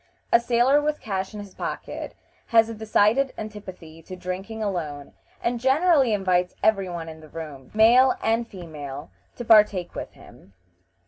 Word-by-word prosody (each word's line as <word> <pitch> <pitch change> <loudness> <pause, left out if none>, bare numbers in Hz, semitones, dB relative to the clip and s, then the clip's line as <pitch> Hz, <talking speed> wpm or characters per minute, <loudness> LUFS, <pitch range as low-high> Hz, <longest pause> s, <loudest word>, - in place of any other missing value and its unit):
A 235 - +8
sailor 245 +4 +3
with 300 0 -1
cash 190 -2 -3
in 210 - -8
his 200 -2 -10
pocket - - -6 0.3
has 225 -1 +4
a - - -5
decided 220 +4 +2
antipathy 185 -7 -9
to 185 +3 -9
drinking 190 +5 -5
alone, 155 -8 -4 0.3
and 240 0 0
generally 270 0 +3
invites 185 -3 +1
every 195 -4 +2
one 170 -2 -6
in 160 0 -9
the 155 -1 -15
room, 145 -5 -9
male 245 +4 +6
and 230 +1 +1
female, 150 -7 -8 0.2
to 240 - -7
partake 210 -5 +4
with - - -7
him. 100 - -17
205 Hz, 155 wpm, -24 LUFS, 175-230 Hz, 0.3 s, A